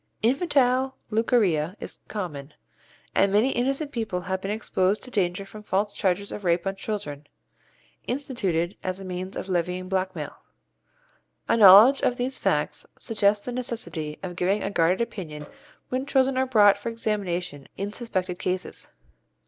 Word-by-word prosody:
Infantile 265 Hz, -1 st, +2 dB
leucorrhoea 205 Hz, -, +2 dB
is -, -, -7 dB
common, 150 Hz, -8 st, -6 dB, 0.6 s
and 195 Hz, 0 st, +3 dB
many 215 Hz, +7 st, +3 dB
innocent 275 Hz, +4 st, -1 dB
people 220 Hz, -8 st, -2 dB
have 190 Hz, +1 st, -3 dB
been 195 Hz, -, -4 dB
exposed 205 Hz, -2 st, 0 dB
to 255 Hz, -, -9 dB
danger 195 Hz, -2 st, 0 dB
from 210 Hz, +2 st, -11 dB
false 205 Hz, 0 st, -1 dB
charges 195 Hz, +1 st, 0 dB
of 210 Hz, -, -6 dB
rape 170 Hz, 0 st, +1 dB
on 195 Hz, 0 st, -1 dB
children, 150 Hz, -9 st, -5 dB, 0.8 s
instituted 200 Hz, -, -1 dB
as 185 Hz, 0 st, -3 dB
a 195 Hz, -, -8 dB
means 185 Hz, +1 st, -5 dB
of -, -, -5 dB
levying 180 Hz, 0 st, -1 dB
blackmail. 185 Hz, -4 st, -3 dB, 1.1 s
A -, -, +3 dB
knowledge 220 Hz, +5 st, +9 dB
of 245 Hz, -, +1 dB
these 255 Hz, +2 st, -2 dB
facts -, -, 0 dB
suggests 205 Hz, -3 st, +1 dB
the 250 Hz, -, -3 dB
necessity 225 Hz, -11 st, -4 dB
of 180 Hz, -2 st, -5 dB
giving 190 Hz, +4 st, +1 dB
a -, -, -2 dB
guarded 175 Hz, +2 st, +2 dB
opinion 175 Hz, -10 st, -5 dB, 0.4 s
when 260 Hz, +2 st, -2 dB
children 265 Hz, -1 st, +3 dB
are 260 Hz, 0 st, +1 dB
brought 205 Hz, -5 st, +5 dB
for 220 Hz, -, -3 dB
examination 180 Hz, -9 st, -3 dB
in 200 Hz, +2 st, -3 dB
suspected 185 Hz, -6 st, -3 dB
cases. 185 Hz, 0 st, -3 dB
200 Hz, 150 wpm, -25 LUFS, 180-235 Hz, 1.1 s, knowledge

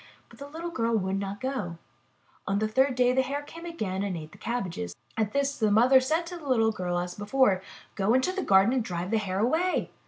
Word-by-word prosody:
But -, -, -17 dB
the 280 Hz, -, -7 dB
little 330 Hz, +4 st, -6 dB
girl 230 Hz, -7 st, +1 dB
would 190 Hz, -1 st, -1 dB
not 200 Hz, 0 st, -4 dB
go. 255 Hz, -11 st, -3 dB, 0.7 s
The 205 Hz, +2 st, +1 dB
third 260 Hz, +4 st, +2 dB
day 250 Hz, 0 st, +3 dB
the 260 Hz, -, +3 dB
Hare 280 Hz, +3 st, -3 dB
came 335 Hz, +3 st, -10 dB
again 205 Hz, -, -3 dB
and 200 Hz, -3 st, -2 dB
ate 155 Hz, -1 st, -9 dB
the -, -, -16 dB
cabbages. 175 Hz, -, -3 dB, 0.2 s
At 215 Hz, -2 st, 0 dB
this, 280 Hz, +1 st, 0 dB
the 215 Hz, -2 st, +3 dB
mother 245 Hz, +6 st, +6 dB
said 315 Hz, +6 st, 0 dB
to 350 Hz, +1 st, -7 dB
the 295 Hz, -, -10 dB
little 225 Hz, -3 st, +3 dB
girl 180 Hz, -4 st, -2 dB
as 175 Hz, 0 st, -3 dB
before: 205 Hz, -2 st, +2 dB, 0.3 s
*'Go 205 Hz, +5 st, +2 dB
into 260 Hz, +8 st, +2 dB
the 380 Hz, +1 st, -3 dB
garden 195 Hz, -, +4 dB
and 255 Hz, -3 st, +1 dB
drive 180 Hz, 0 st, -4 dB
the 225 Hz, -, +3 dB
Hare 190 Hz, -3 st, -3 dB
away." 320 Hz, -, +1 dB
225 Hz, 225 wpm, -27 LUFS, 195-275 Hz, 0.7 s, mother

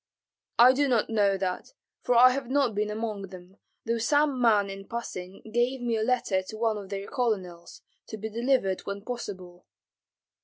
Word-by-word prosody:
"I 245 Hz, +2 st, +8 dB
do 285 Hz, +2 st, +2 dB
not 235 Hz, -4 st, +1 dB
know 200 Hz, -3 st, +2 dB
that, 185 Hz, -, -4 dB, 0.3 s
for 245 Hz, -, +1 dB
I 250 Hz, +2 st, +8 dB
have 260 Hz, -1 st, -4 dB
not 270 Hz, -4 st, +2 dB
been 210 Hz, +1 st, -1 dB
among 210 Hz, -2 st, -4 dB
them, 185 Hz, +1 st, -13 dB, 0.3 s
though 230 Hz, 0 st, 0 dB
some 290 Hz, +1 st, +2 dB
man 210 Hz, -4 st, +4 dB
in 195 Hz, 0 st, -8 dB
passing 195 Hz, -5 st, -6 dB
gave 245 Hz, +2 st, +1 dB
me 240 Hz, -2 st, -1 dB
a 220 Hz, -, -1 dB
letter 220 Hz, -5 st, +1 dB
to 200 Hz, +3 st, -9 dB
one 220 Hz, -1 st, 0 dB
of 195 Hz, -2 st, -10 dB
their 200 Hz, 0 st, -4 dB
colonels, 190 Hz, -9 st, -3 dB, 0.2 s
to 220 Hz, -, -7 dB
be 215 Hz, +1 st, -5 dB
delivered 230 Hz, -4 st, 0 dB
when 200 Hz, 0 st, -5 dB
possible." 185 Hz, -7 st, -7 dB
220 Hz, 180 wpm, -27 LUFS, 195-245 Hz, 0.3 s, I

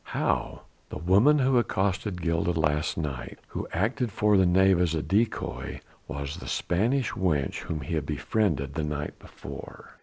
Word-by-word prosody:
"How?" -, -, -1 dB, 0.3 s
"The -, -, -5 dB
woman 100 Hz, -, +5 dB
who 130 Hz, -2 st, +4 dB
accosted 95 Hz, -4 st, -1 dB
Gilda 85 Hz, 0 st, +1 dB
last 75 Hz, -1 st, +1 dB
night, 70 Hz, -6 st, -4 dB
who -, -, -4 dB
acted 115 Hz, +6 st, 0 dB
for 105 Hz, +2 st, +3 dB
the 95 Hz, -2 st, +5 dB
knave 95 Hz, 0 st, +4 dB
as 85 Hz, -2 st, +1 dB
a 80 Hz, -, -1 dB
decoy, 105 Hz, +8 st, -1 dB, 0.3 s
was 70 Hz, +1 st, -5 dB
the -, -, -9 dB
Spanish 120 Hz, +9 st, +1 dB
wench 75 Hz, -8 st, 0 dB
whom 80 Hz, -2 st, -4 dB
he 65 Hz, -, -5 dB
had 80 Hz, -, -1 dB
befriended 75 Hz, -11 st, 0 dB
the 80 Hz, -, -2 dB
night 75 Hz, -1 st, -4 dB
before." -, -, -11 dB
90 Hz, 160 wpm, -27 LUFS, 75-105 Hz, 0.3 s, woman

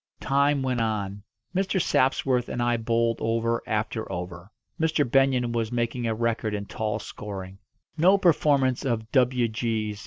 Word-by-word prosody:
Time 140 Hz, +1 st, +2 dB
went 125 Hz, -2 st, 0 dB
on. 100 Hz, -3 st, -2 dB, 0.3 s
Mr. 190 Hz, 0 st, +1 dB
Sapsworth 130 Hz, -4 st, +1 dB
and -, -, -4 dB
I 120 Hz, 0 st, +2 dB
bowled 115 Hz, 0 st, 0 dB
over 115 Hz, +1 st, 0 dB
after 110 Hz, 0 st, -2 dB
over. 90 Hz, 0 st, -6 dB, 0.3 s
Mr. 160 Hz, -3 st, +1 dB
Benyon 130 Hz, -1 st, +2 dB
was 115 Hz, -1 st, -1 dB
making 120 Hz, 0 st, -1 dB
a 110 Hz, -, 0 dB
record 115 Hz, -2 st, -1 dB
in 100 Hz, 0 st, -4 dB
tall 105 Hz, +1 st, -3 dB
scoring. 95 Hz, -2 st, -8 dB, 0.4 s
No 185 Hz, +5 st, +6 dB
performance 145 Hz, -8 st, +2 dB
of 115 Hz, -4 st, -2 dB
"W. 125 Hz, -2 st, +3 dB
G.' 110 Hz, -2 st, -2 dB
115 Hz, 150 wpm, -26 LUFS, 110-130 Hz, 0.4 s, No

